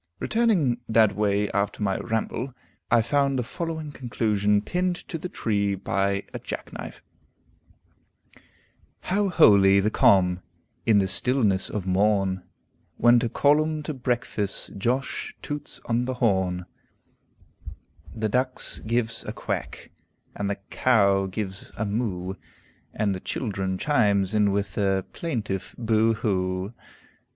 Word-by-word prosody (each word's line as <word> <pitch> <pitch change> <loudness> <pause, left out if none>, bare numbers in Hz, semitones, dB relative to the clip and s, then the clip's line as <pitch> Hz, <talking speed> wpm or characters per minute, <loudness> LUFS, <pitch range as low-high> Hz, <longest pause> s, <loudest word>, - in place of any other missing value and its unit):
Returning 190 - +1
that 110 -3 +4
way 105 0 +1
after 100 +1 -1
my 95 -2 0
ramble, 115 +3 -3 0.3
I 115 -1 +4
found 140 +2 +1
the 125 - 0
following 160 +2 -5
conclusion 105 -5 0
pinned 180 - 0
to 165 - -4
the 180 - -5
tree 100 - 0
by 100 +1 -1
a - - -4
jackknife: - - -7 2.0
"How 200 +1 0
holy 100 - +6
the 105 +2 +1
calm, 90 -3 +4 0.5
in 110 -2 +5
the 95 -1 +3
stillness 100 -1 +1
of 105 -4 -4
morn, 95 0 +2 0.6
When 120 +1 +6
to 120 -1 -1
call 145 +5 +4
'em 155 -1 -2
to 155 - -4
breakfast 120 -5 -2
Josh 125 +7 -2
toots 145 0 -5
on 120 +1 0
the 130 0 -3
horn, 95 -6 +1 1.5
The 110 -1 -2
ducks 125 +4 0
gives 115 +1 -1
a - - -4
quack, - - -5 0.4
and 100 -1 -2
the 100 - -2
caow 100 -6 +3
gives 95 0 -5
a 110 - -1
moo, 100 -4 -2 0.6
And 105 -2 0
the 95 - -6
childen 95 -5 -3
chimes 100 -7 +2
in 105 -2 +3
with 100 -1 -1
their 95 -2 +1
plaintive 105 - -4
boo 115 -1 +2
hoo. 95 -1 -1
105 Hz, 130 wpm, -25 LUFS, 100-125 Hz, 2.0 s, holy